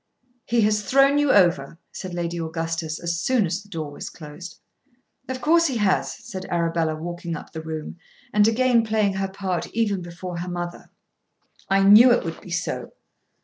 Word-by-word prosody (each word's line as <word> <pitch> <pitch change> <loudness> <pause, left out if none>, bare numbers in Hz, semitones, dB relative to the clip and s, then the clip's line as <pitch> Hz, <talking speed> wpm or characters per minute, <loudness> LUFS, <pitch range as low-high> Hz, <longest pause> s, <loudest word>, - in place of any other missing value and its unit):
"He 235 0 +2
has 210 0 +2
thrown 275 +6 +4
you 290 -2 +3
over," 170 -6 +3
said 185 -2 -7
Lady 170 0 -3
Augustus 165 -1 -3
as 170 -1 -2
soon 250 -2 +2
as 180 +3 -2
the 205 - -19
door 155 -6 -5
was - - -7
closed. 155 +3 -10 0.7
"Of 260 0 -4
course 335 +2 +4
he 260 -4 -2
has," 205 -3 +1
said 190 -1 -6
Arabella 165 -2 0
walking 170 +1 -5
up - - -9
the 160 - -6
room, 160 +1 -6 0.3
and 210 0 +5
again 235 0 +3
playing 215 -3 +1
her 195 0 -1
part 190 -2 -3
even 205 -5 +1
before 175 +1 -7
her 180 +1 -4
mother. 175 0 -6 0.8
"I 195 0 +3
knew 215 +6 +8
it 240 - +2
would 165 -1 -5
be - - -12
so." 175 0 -3
185 Hz, 180 wpm, -23 LUFS, 170-215 Hz, 0.8 s, knew